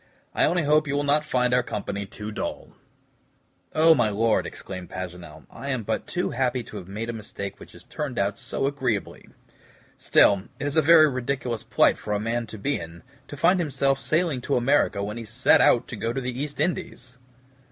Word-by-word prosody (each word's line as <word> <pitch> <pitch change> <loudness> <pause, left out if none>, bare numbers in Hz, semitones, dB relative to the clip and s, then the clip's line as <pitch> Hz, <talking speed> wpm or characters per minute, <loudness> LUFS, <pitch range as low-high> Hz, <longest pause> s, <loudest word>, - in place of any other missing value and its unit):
I - - +3
only 175 +1 +1
hope 150 +1 +3
you 140 - -1
will 145 - +1
not 145 +1 +2
find 125 -4 +1
our 125 - +4
company 100 -3 -4
too 105 +2 -7
dull." - - -5 1.1
"Oh, 160 +1 +7
my 120 -7 +2
Lord," 110 +2 +1
exclaimed 95 -2 -8
Paganel, 90 -1 -8
"I 140 - -7
am 130 -4 -1
but - - -3
too - - -2
happy 125 -1 0
to - - -9
have 90 - -9
made 105 +4 -5
a 120 - -3
mistake 100 -3 -7
which - - -13
has 85 - -13
turned 145 - -5
out 100 0 0
so - - -3
agreeably. 130 -7 -2 0.7
Still, 100 -2 +4
it - - -3
is 145 - -2
a 160 - +5
very 155 0 +7
ridiculous 130 -3 -2
plight - - +3
for 105 - -3
a 105 - 0
man 115 +2 -2
to 110 - -8
be 140 +8 -1
in, 85 +1 -10 0.2
to 145 - -9
find 180 +6 +3
himself 140 -4 0
sailing 155 -2 0
to 140 - -1
America 120 -5 +2
when 105 +2 -4
he 115 - -5
set 115 +4 +3
out 120 0 +4
to - - -5
go 115 +1 -2
to 130 - -2
the 125 +1 -4
East 145 -1 -5
Indies!" 130 -6 -3
125 Hz, 205 wpm, -25 LUFS, 105-145 Hz, 1.1 s, Oh